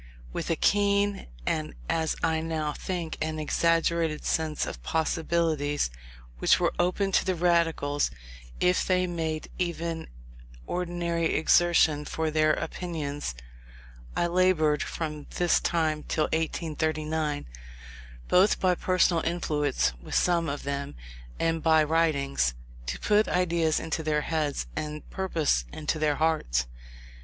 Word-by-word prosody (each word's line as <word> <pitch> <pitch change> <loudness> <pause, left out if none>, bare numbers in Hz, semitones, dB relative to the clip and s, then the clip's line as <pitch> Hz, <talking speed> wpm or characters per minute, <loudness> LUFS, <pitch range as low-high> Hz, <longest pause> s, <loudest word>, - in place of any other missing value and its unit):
With - - -3
a 165 - +2
keen, 200 +2 +2 0.2
and - - -2
as 160 -1 0
I 160 -1 +2
now 160 -2 -2
think, 175 -2 -4
an 155 0 -2
exaggerated 165 0 +1
sense 155 -2 0
of - - -5
the - - -20
possibilities 160 - 0 0.5
which - - +4
were - - +1
open 180 +3 +1
to - - +3
the 185 -1 0
Radicals 165 -4 +2 0.5
if 180 0 +3
they 185 -1 +2
made 160 -3 -3
even 170 -2 -2 0.6
ordinary 170 -2 -1
exertion 160 -2 +4
for 160 0 -2
their 155 0 +3
opinions, 145 - -4 0.8
I - - +2
laboured 170 -4 +3
from 150 -3 -4
this 175 -1 +3
time 160 -3 0
till 155 - +1
1839, 155 - -1 0.8
both 190 +3 +4
by 185 -1 +3
personal 180 -2 +2
influence 150 - 0
with - - -6
some 170 -3 +2
of 140 +1 -4
them, 140 - -4 0.4
and 165 0 +1
by 160 -1 +5
writings, 140 - +1 0.3
to - - -3
put 210 +1 +3
ideas 170 -3 +1
into 160 0 -2
their 150 -1 0
heads, 150 -2 -1
and 150 0 -5
purpose 165 - 0
into 155 +1 -2
their 150 -1 +2
hearts. 145 - +1
160 Hz, 130 wpm, -27 LUFS, 150-170 Hz, 0.8 s, by